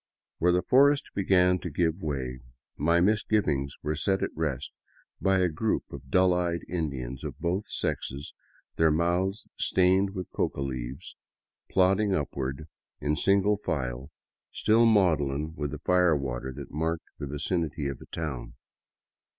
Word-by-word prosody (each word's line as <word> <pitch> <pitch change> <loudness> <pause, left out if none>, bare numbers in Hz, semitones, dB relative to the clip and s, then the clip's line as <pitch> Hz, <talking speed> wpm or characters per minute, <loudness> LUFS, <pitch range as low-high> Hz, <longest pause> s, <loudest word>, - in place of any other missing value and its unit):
Where 90 +2 +4
the 90 0 +2
forest 140 +6 +4
began 90 -2 +3
to 85 - -5
give 85 +3 0
way, 65 -5 -3 0.4
my 85 +4 +2
misgivings 95 -9 +1
were 75 +1 -1
set 95 +5 0
at - - -3
rest 75 -4 -2 0.5
by 95 0 +3
a 90 -1 +3
group 90 +7 -1
of 70 -1 -10
dull 90 +3 +4
eyed 85 -1 0
Indians 70 -7 -4
of - - -5
both 90 +5 -1
sexes, 70 +2 -3 0.4
their 80 0 +5
mouths 85 +5 0
stained 95 +2 +3
with 90 -2 -5
coca - - -1
leaves, 65 -1 -5 0.5
plodding 95 +2 +3
upward 70 0 -3 0.3
in 75 +1 0
single 100 +4 +3
file, 65 -8 -3 0.4
still 115 +2 +4
maudlin 80 -8 +2
with 75 -3 -3
the 75 - -5
fire 90 +1 +3
water 65 -1 -4
that 70 +1 -9
marked 80 +2 -2
the 70 - -4
vicinity 80 +1 -2
of 70 -2 -5
a - - -12
town. 75 -7 -5
80 Hz, 145 wpm, -28 LUFS, 70-95 Hz, 0.5 s, their